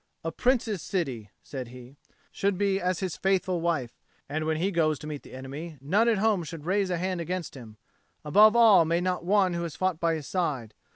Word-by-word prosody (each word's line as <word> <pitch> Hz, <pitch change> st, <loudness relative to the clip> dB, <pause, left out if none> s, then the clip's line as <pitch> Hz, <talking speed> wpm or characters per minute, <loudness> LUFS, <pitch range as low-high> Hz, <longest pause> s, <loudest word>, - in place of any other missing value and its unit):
"A 165 Hz, -, -2 dB
Prince's 225 Hz, -3 st, 0 dB
city," 130 Hz, -, -3 dB
said 130 Hz, -3 st, -6 dB
he, 125 Hz, +2 st, -12 dB, 0.4 s
"should 200 Hz, -1 st, 0 dB
be 200 Hz, 0 st, +1 dB
as 180 Hz, 0 st, -1 dB
his 185 Hz, -3 st, -2 dB
faithful 185 Hz, -2 st, 0 dB
wife; 160 Hz, -8 st, -2 dB, 0.3 s
and 155 Hz, +2 st, -3 dB
when 160 Hz, 0 st, 0 dB
he 185 Hz, +5 st, 0 dB
goes 155 Hz, -4 st, +1 dB
to -, -, -11 dB
meet 150 Hz, -2 st, -5 dB
the -, -, -15 dB
enemy, 145 Hz, +5 st, -7 dB
none 200 Hz, -, +2 dB
at 225 Hz, -, +2 dB
home 205 Hz, -3 st, +2 dB
should 160 Hz, -1 st, -8 dB
raise 195 Hz, +1 st, +1 dB
a 175 Hz, -, 0 dB
hand 185 Hz, 0 st, -2 dB
against 180 Hz, 0 st, -4 dB
him; 115 Hz, -5 st, -12 dB, 0.5 s
above 210 Hz, +9 st, +6 dB
all 225 Hz, -7 st, +7 dB
may 165 Hz, +1 st, +1 dB
not 180 Hz, -1 st, -1 dB
one 190 Hz, 0 st, +3 dB
who 170 Hz, -, -2 dB
has 165 Hz, -4 st, -5 dB
fought 185 Hz, -1 st, -1 dB
by 165 Hz, -1 st, +1 dB
his 155 Hz, -3 st, -6 dB
side. 140 Hz, -, -2 dB
170 Hz, 215 wpm, -27 LUFS, 150-190 Hz, 0.5 s, all